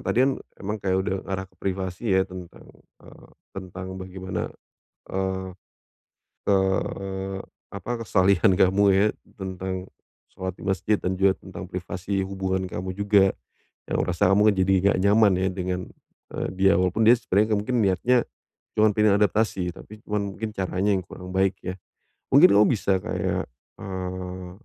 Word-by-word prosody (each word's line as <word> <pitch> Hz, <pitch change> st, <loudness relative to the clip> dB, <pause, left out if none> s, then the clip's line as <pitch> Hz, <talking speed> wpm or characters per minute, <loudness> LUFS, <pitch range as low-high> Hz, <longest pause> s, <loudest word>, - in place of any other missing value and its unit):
tadi 120 Hz, -, 0 dB
kan 135 Hz, -, +2 dB, 0.3 s
emang 105 Hz, +2 st, -3 dB
kayak 95 Hz, -1 st, +1 dB
udah 95 Hz, 0 st, -1 dB
ngarah 95 Hz, 0 st, -2 dB
ke -, -, -31 dB
privasi 95 Hz, +2 st, -2 dB
ya, 95 Hz, 0 st, +3 dB
tentang, 90 Hz, -2 st, -11 dB, 0.4 s
eee, -, -, -15 dB, 0.3 s
tentang 95 Hz, -1 st, -7 dB
bagaimana, 95 Hz, 0 st, -5 dB, 0.6 s
eee 95 Hz, 0 st, -2 dB, 1.0 s
eee, 95 Hz, 0 st, 0 dB, 0.3 s
apa 100 Hz, +4 st, -6 dB
kesalihan 95 Hz, 0 st, +4 dB
kamu 95 Hz, +1 st, +4 dB
ya, 100 Hz, +2 st, +4 dB, 0.3 s
tentang 95 Hz, 0 st, -4 dB, 0.4 s
sholat 95 Hz, 0 st, -5 dB
di -, -, -14 dB
masjid, 100 Hz, +2 st, +1 dB
dan 95 Hz, 0 st, -1 dB
juga 95 Hz, 0 st, +5 dB
tentang 95 Hz, 0 st, -9 dB
privasi 90 Hz, +2 st, -3 dB
hubungan 95 Hz, -1 st, -2 dB
kamu, 95 Hz, +1 st, -4 dB
juga. 100 Hz, -1 st, +4 dB, 0.6 s
Yang -, -, -1 dB
merasa 90 Hz, +2 st, +1 dB
kamu 105 Hz, +1 st, +5 dB
kan -, -, -4 dB
jadi 95 Hz, +1 st, +3 dB
enggak 100 Hz, -, +3 dB
nyaman 105 Hz, 0 st, +5 dB
ya 95 Hz, -, +2 dB
dengan, 90 Hz, -1 st, -2 dB, 0.6 s
eee, -, -, -2 dB
dia. 95 Hz, +1 st, +4 dB
Walaupun 90 Hz, +4 st, +1 dB
dia 120 Hz, -, +9 dB
sebenarnya 105 Hz, 0 st, +2 dB
mungkin 125 Hz, +5 st, -1 dB
niatnya 110 Hz, +6 st, +3 dB, 0.6 s
cuma 110 Hz, 0 st, +6 dB
pengen 105 Hz, -1 st, +4 dB
adaptasi, 105 Hz, -4 st, +1 dB
tapi 110 Hz, 0 st, -12 dB
cuman 100 Hz, -2 st, -2 dB
mungkin 110 Hz, -1 st, -3 dB
caranya 95 Hz, +2 st, 0 dB
yang -, -, -1 dB
kurang 90 Hz, 0 st, -9 dB
baik 95 Hz, 0 st, +2 dB
ya. 90 Hz, -, -3 dB, 0.6 s
Mungkin 150 Hz, +7 st, +8 dB
kamu 105 Hz, +1 st, +6 dB
bisa 100 Hz, -5 st, +1 dB
kayak, -, -, -2 dB, 0.3 s
eee, 95 Hz, -1 st, -5 dB
95 Hz, 150 wpm, -25 LUFS, 95-100 Hz, 1.0 s, dia